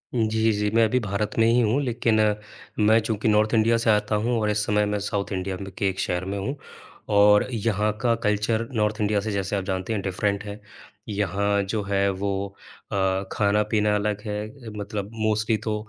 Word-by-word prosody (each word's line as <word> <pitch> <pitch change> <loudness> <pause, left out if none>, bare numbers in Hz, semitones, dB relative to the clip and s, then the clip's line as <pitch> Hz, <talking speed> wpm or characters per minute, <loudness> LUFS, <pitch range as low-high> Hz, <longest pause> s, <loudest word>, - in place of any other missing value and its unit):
जी, 110 0 +2
जी 105 0 0
मैं 115 0 +5
अभी 125 +4 +1
भारत 105 -1 -2
में 115 - +5
ही 120 +1 +4
हूँ 115 +6 +2
लेक़िन 115 -3 +1 0.6
मैं 110 +2 +5
चूँकि 110 -1 -2
नॉर्थ 105 +1 +3
इंडिया 115 +1 +4
से 115 0 0
आता 105 0 +2
हूँ 120 -1 +1
और 105 - +1
इस 105 0 0
समय 105 0 +2
मैं 105 0 -1
साउथ 100 0 -3
इंडिया 95 0 -3
में 95 0 -7
के 100 - +1
एक 95 - -5
शहर 90 +1 -1
में 100 +1 -3
हूँ 130 +9 -3 0.6
और 105 0 +6
यहाँ 105 -2 0
का 120 -2 +3
कल्चर 110 +2 0
नॉर्थ 105 0 0
इंडिया 105 0 +2
से 110 +1 -3
जैसे 100 0 -2
आप 95 - -1
जानते 95 +3 -2
हैं 100 - -1
डिफरेंट 100 +2 -1
है। 105 0 -7 0.5
यहाँ 100 0 0
जो 105 +2 -2
है 100 0 +1
वो 100 +1 -3 0.4
अ, - - -2 0.4
खाना-पीना 105 0 +1
अलग 105 0 -1
है। 110 +4 -6
मतलब 100 0 -4
मोस्टली 110 0 0
तो 110 0 -3
105 Hz, 195 wpm, -24 LUFS, 100-110 Hz, 0.6 s, और